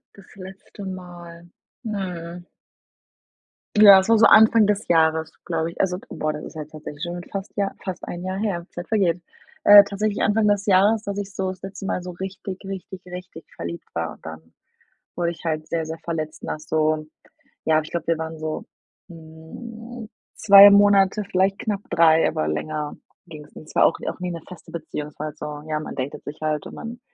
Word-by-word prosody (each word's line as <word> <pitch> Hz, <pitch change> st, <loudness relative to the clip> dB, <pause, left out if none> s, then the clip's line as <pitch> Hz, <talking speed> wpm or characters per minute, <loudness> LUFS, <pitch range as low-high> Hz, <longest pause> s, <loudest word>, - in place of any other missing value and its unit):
Das 195 Hz, -1 st, -17 dB
letzte 195 Hz, +1 st, -11 dB
Mal. 175 Hz, -2 st, -9 dB, 0.4 s
Hm. 180 Hz, -4 st, -5 dB, 1.3 s
Ja 205 Hz, -2 st, +9 dB
das 190 Hz, +1 st, +2 dB
war 230 Hz, -1 st, +4 dB
so 225 Hz, -, +8 dB
Anfang 220 Hz, -1 st, +6 dB
des 210 Hz, +1 st, -1 dB
Jahres, 160 Hz, -1 st, +2 dB
glaube 165 Hz, -1 st, -2 dB
ich, -, -, -2 dB
also 180 Hz, -2 st, 0 dB
d -, -, -14 dB
boah 155 Hz, 0 st, -2 dB
das 150 Hz, 0 st, -7 dB
ist -, -, -11 dB
halt 155 Hz, -1 st, -7 dB
tatsächlich 150 Hz, -1 st, -10 dB
schon 175 Hz, 0 st, -4 dB
fast 195 Hz, +1 st, -6 dB
Jahr 200 Hz, -1 st, 0 dB
fast 185 Hz, -2 st, -6 dB
1 175 Hz, +1 st, -6 dB
Jahr 185 Hz, +1 st, -3 dB
her, 195 Hz, -4 st, -2 dB
Zeit 175 Hz, -, -8 dB
vergeht. 185 Hz, -6 st, +1 dB, 0.4 s
Äh, 205 Hz, 0 st, +10 dB
tatsächlich 205 Hz, +1 st, -2 dB
Anfang 210 Hz, +1 st, +2 dB
des 205 Hz, 0 st, +1 dB
Jahres, 205 Hz, +3 st, +4 dB
dass 200 Hz, -1 st, -4 dB
ich 200 Hz, -1 st, -5 dB
so 190 Hz, 0 st, -2 dB
das 185 Hz, 0 st, -8 dB
letzte 195 Hz, 0 st, -7 dB
Mal 180 Hz, -, -2 dB
so 180 Hz, -, -6 dB
richtig, 190 Hz, +1 st, -7 dB
richtig, 190 Hz, -1 st, -7 dB
richtig 180 Hz, -2 st, -9 dB
verliebt 85 Hz, 0 st, -7 dB
war 80 Hz, 0 st, -3 dB
dann, 80 Hz, +1 st, -11 dB, 0.6 s
wo 175 Hz, -, -3 dB
ich 170 Hz, 0 st, -3 dB
halt 155 Hz, -1 st, -2 dB
sehr, 165 Hz, -1 st, -2 dB
sehr 160 Hz, -, -5 dB
verletzt 155 Hz, -2 st, -4 dB
nach 155 Hz, -, -4 dB
so. 155 Hz, 0 st, 0 dB, 0.6 s
Ja, 155 Hz, -1 st, +4 dB
ich 155 Hz, -, -11 dB
glaube, 170 Hz, -2 st, -4 dB
wir 165 Hz, -, +2 dB
waren 160 Hz, 0 st, -6 dB
so, 155 Hz, 0 st, -4 dB, 0.4 s
hm, 215 Hz, +9 st, -10 dB, 0.2 s
2 200 Hz, 0 st, +9 dB
Monate, 200 Hz, 0 st, +4 dB
vielleicht 195 Hz, 0 st, 0 dB
knapp 205 Hz, -3 st, -2 dB
3, 165 Hz, -1 st, +5 dB
aber 75 Hz, -, -1 dB
länger 150 Hz, -, -3 dB, 0.3 s
ging's 150 Hz, -3 st, -11 dB
nicht -, -, -30 dB
und -, -, -10 dB
es -, -, -14 dB
war -, -, +5 dB
auch -, -, +2 dB
n -, -, -3 dB
auch -, -, -7 dB
nie 180 Hz, -1 st, -3 dB
'ne 170 Hz, -1 st, -6 dB
feste 170 Hz, -2 st, -12 dB
Beziehung, 155 Hz, -3 st, -6 dB
es -, -, -25 dB
war 155 Hz, -, -3 dB
halt 150 Hz, 0 st, -9 dB
so, 150 Hz, -1 st, -6 dB
ja, 155 Hz, -1 st, -1 dB
man 155 Hz, -, -7 dB
datet 130 Hz, +2 st, -5 dB
sich 145 Hz, -, -8 dB
halt 155 Hz, -1 st, -1 dB
und -, -, -9 dB
man, 230 Hz, +1 st, -8 dB
175 Hz, 205 wpm, -23 LUFS, 160-195 Hz, 1.3 s, Äh